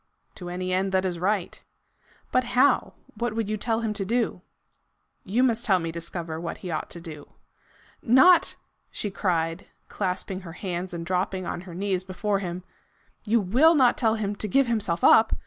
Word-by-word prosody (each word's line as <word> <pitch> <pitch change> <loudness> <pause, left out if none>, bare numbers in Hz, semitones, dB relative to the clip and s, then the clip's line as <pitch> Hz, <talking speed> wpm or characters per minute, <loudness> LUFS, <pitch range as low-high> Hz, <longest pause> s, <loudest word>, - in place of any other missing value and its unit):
"To 180 -1 -8
any 185 +1 -3
end 190 +1 0
that 190 0 +2
is 175 -2 -2
right." 190 0 -1 0.7
"But 255 - +3
how? 280 +3 +3 0.2
What 240 -2 -3
would 225 -2 -1
you 215 - -1
tell 225 +2 -1
him 220 -2 -1
to 205 - -3
do?" 225 -2 -1 0.8
"You 225 +7 +1
must 235 -2 +1
help 185 -4 +3
me 165 - -2
to 170 - -6
discover 165 -1 -6
what 170 - -5
he 180 - -3
ought 155 - -3
to 170 - -7
do." 155 -4 -10 0.7
"Not 265 +10 +5 0.2
" - - -48
she 205 - -4
cried, 165 -2 -1 0.2
clasping 185 -1 -3
her 170 -4 -10
hands 180 0 -4
and 170 -1 -5
dropping 185 +1 -1
on 175 - -4
her 170 - -9
knees 190 -1 -1
before 195 +2 -2
him, 180 -1 -5 0.3
" - - -27
you 230 +2 +4
WILL 255 - +4
not 255 -4 +4
tell 225 -3 +2
him 205 -2 -2
to 215 - -2
give 275 +7 +3
himself 215 -8 -1
up? 220 0 +6
190 Hz, 195 wpm, -25 LUFS, 180-225 Hz, 0.8 s, up